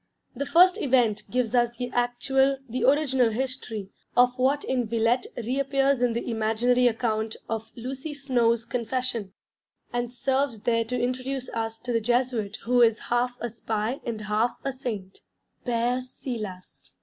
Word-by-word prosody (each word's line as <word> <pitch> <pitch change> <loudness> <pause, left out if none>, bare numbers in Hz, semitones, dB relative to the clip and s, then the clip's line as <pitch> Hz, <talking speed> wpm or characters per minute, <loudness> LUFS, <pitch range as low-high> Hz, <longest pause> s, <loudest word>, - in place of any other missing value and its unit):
The 280 +3 -3
first 365 +4 +5
event 240 -7 +2
gives 245 0 0
us 240 -1 +2
the 245 0 -4
actual, 265 +3 +2
the 250 +2 -3
original 265 -4 +4
history, 225 -4 -4 0.3
of 250 0 +5
what 275 +3 +2
in 250 -3 0
Villette 230 +2 +1
reappears 270 +2 +1
in 245 -2 +2
the 235 - -3
imaginary 235 +2 +2
account 220 -2 -1
of 225 0 -3
Lucy 265 +5 -5
Snowe's 240 -5 +1
Confession: 235 -3 -2 0.6
and 240 0 -1
serves 260 -2 0
there 230 0 +1
to 250 +2 -2
introduce 255 +1 -2
us 225 0 -3
to 245 0 -3
the 230 - +2
Jesuit 240 -3 0
who 245 +1 +3
is 225 -2 +5 0.2
half 245 0 +1
a 240 - -3
spy 225 +2 -2
and 230 -4 -4
half 215 +3 0
a 275 - -1
saint 220 -8 -6 0.5
Père 245 +1 +1
Silas. 230 -8 -7
245 Hz, 150 wpm, -26 LUFS, 225-255 Hz, 0.6 s, first